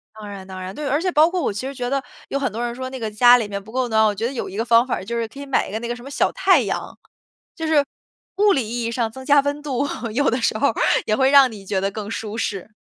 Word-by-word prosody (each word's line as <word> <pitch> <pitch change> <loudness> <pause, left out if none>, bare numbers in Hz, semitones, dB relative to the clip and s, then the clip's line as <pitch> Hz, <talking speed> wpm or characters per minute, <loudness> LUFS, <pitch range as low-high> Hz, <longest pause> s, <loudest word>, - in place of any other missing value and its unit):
当 215 -1 -9
然 195 -2 -8
当 185 -1 -8
然， 185 +1 -7
对。 295 -1 -4
而 290 +4 +1
且 365 0 0
包 310 +1 +5
括 360 0 -2
我 - - 0
其 210 +6 -5
实 275 - -5
觉 245 -2 -4
得 275 0 -1 0.3
有 275 - -1
很 270 -5 -1
多 230 +4 -4
人 240 0 -3
说 260 +1 -5
那 260 -1 -7
个 220 -1 -3
家 245 +3 +6
里 225 -4 -2
面 200 -1 -5
不 220 - -13
够 255 0 0
暖， 220 -1 +3
我 210 - +2
觉 210 +3 -3
得 255 - -2
有 240 - -4
一 195 - -8
个 225 - -1
方 235 +1 +5
法 255 - -2
就 235 +4 -4
是 230 -1 -1
可 275 - -13
以 280 - -6
买 275 - 0
一 - - -9
个 220 - -3
那 235 - -5
个 240 - -3
什 240 - -12
么 275 - -9
小 - - +1
太 - - +4
阳。 - - -4 0.6
就 325 -3 -4
是 300 -2 +4 0.5
物 410 0 +5
理 255 - -1
意 235 +1 -3
义 230 - -2
上 230 -2 -1
增 265 +2 -10
加 290 0 +5
温 285 +1 -3
度， 280 -1 -1 0.3
有 285 +5 +2
的 245 - +1
时 215 - +1
候 280 -3 +2 0.3
也 215 - +1
会 265 +2 +3
让 275 -2 +6
你 200 -3 -11
觉 195 0 -1
得 195 +1 -1
更 210 0 -6
舒 225 -1 -5
适。 205 -2 -3
240 Hz, 340 characters per minute, -21 LUFS, 215-275 Hz, 0.6 s, 家